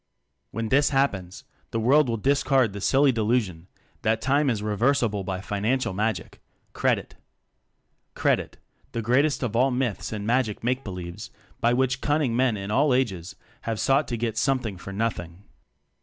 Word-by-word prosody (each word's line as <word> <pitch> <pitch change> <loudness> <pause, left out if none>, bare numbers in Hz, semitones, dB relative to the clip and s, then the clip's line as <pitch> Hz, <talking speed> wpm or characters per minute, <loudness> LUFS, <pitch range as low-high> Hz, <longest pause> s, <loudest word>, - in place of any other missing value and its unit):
When 115 0 -4
this 140 +4 +4
happens, 105 -11 -1 0.3
the 115 - -2
world 135 +4 +4
will 115 - 0
discard 135 -2 +2
the 100 - -6
silly 135 +5 +4
delusion 110 -7 -1 0.3
that 110 -2 +1
time 140 +1 +2
is 115 -4 0
I 105 - -6
reversible 110 -1 +1
by 95 0 -4
financial 105 +4 -1
magic 110 +3 -3 0.3
credit; - - 0 1.0
"credit," - - 0 0.4
the 115 - -2
greatest 135 +6 +2
of 115 -3 -2
all 130 +3 +4
myths 125 -5 -2
and 105 -2 -4
magic 115 -2 0
makebelieves 100 -5 -4 0.3
by 120 0 +2
which 130 +1 +1
cunning 145 -5 +1
men 125 -3 +2
in 100 +1 -5
all 135 +2 +3
ages 95 -10 -2 0.3
have 115 -2 -3
sought 140 +2 +2
to 120 - -3
get 115 -1 -2
something 125 -6 0
for 95 +2 -9
nothing. 95 -4 -3
115 Hz, 155 wpm, -25 LUFS, 105-130 Hz, 1.0 s, this